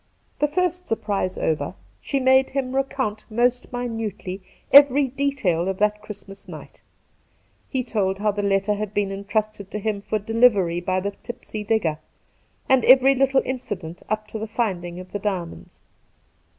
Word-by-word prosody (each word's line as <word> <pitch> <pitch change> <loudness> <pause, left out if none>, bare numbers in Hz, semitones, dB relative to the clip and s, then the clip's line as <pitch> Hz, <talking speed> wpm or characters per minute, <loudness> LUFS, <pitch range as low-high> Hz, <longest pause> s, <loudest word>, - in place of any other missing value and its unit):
The 295 - +3
first 360 +3 -1
surprise 205 -4 -1
over, 150 - -1 0.2
she 275 - -2
made 265 0 +4
him 265 -1 -2
recount 260 -5 -1
most 245 +2 +1
minutely 225 -6 -4 0.3
every 280 0 +8
detail 245 -11 0
of 190 -1 -2
that 210 +1 +1
Christmas 200 -2 -11
night. - - -11 0.9
He 260 -2 -1
told 195 -5 -1
how 210 +1 +1
the 205 0 -3
letter 200 +1 +1
had 210 0 -4
been 200 -1 0
entrusted 200 0 -3
to - - -4
him 210 -1 -2
for 215 - -1
delivery 205 -5 +3
by 185 +1 0
the 200 +1 -2
tipsy 225 -3 -7
digger, 200 -8 0 0.7
and 265 -2 +4
every 265 +1 +7
little 270 0 +2
incident 205 -10 -5
up 215 0 -2
to 220 - -5
the 220 - -4
finding 180 -6 -2
of 185 0 -11
the 205 - -3
diamonds. 190 -5 -5
215 Hz, 155 wpm, -23 LUFS, 195-255 Hz, 0.9 s, every